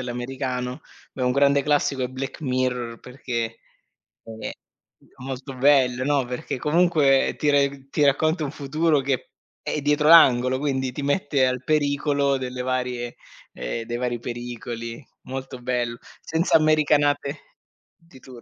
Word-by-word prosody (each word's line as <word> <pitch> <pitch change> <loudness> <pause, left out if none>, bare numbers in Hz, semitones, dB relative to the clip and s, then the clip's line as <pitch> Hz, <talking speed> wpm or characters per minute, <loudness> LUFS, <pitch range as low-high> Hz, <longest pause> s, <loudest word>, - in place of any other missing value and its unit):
all'americano 125 0 -4 0.3
beh, 130 - -3
un 125 - +2
grande 140 0 +3
classico 145 -2 +1
è - - +1
"Black 130 +4 -6
Mirror" 125 -3 -2
perché, 120 -3 -4 0.7
è 110 -1 -7 0.5
è - - -26 0.2
molto 135 +1 -6
bello, 130 -2 +3
no? 145 -2 +2
Perché, 125 +1 -4
comunque, 150 -2 +3
ti 150 - +1
reg 140 -1 +1
ti 145 +1 +2
racconta 155 +3 +2
un 135 - -4
futuro 150 +1 +1
che, 135 -2 -2 0.3
è 150 - -3
dietro 150 +1 +2
l'angolo, 130 -6 +6
quindi 130 -2 -1
ti 145 - -5
mette 145 -2 +1
al 125 0 -1
pericolo 145 -2 +1
delle 125 -1 -5
varie, 125 -1 -3 0.4
ehm, 115 - -4
dei 120 +1 -3
vari 120 -1 -2
pericoli. 120 0 -6 0.2
Molto 130 0 -6
bell 120 -1 -2 0.2
senza 160 +3 +1
americanate 150 -2 +2 0.4
di 165 -5 -19
tur 125 -2 -13
135 Hz, 140 wpm, -24 LUFS, 125-145 Hz, 0.7 s, l'angolo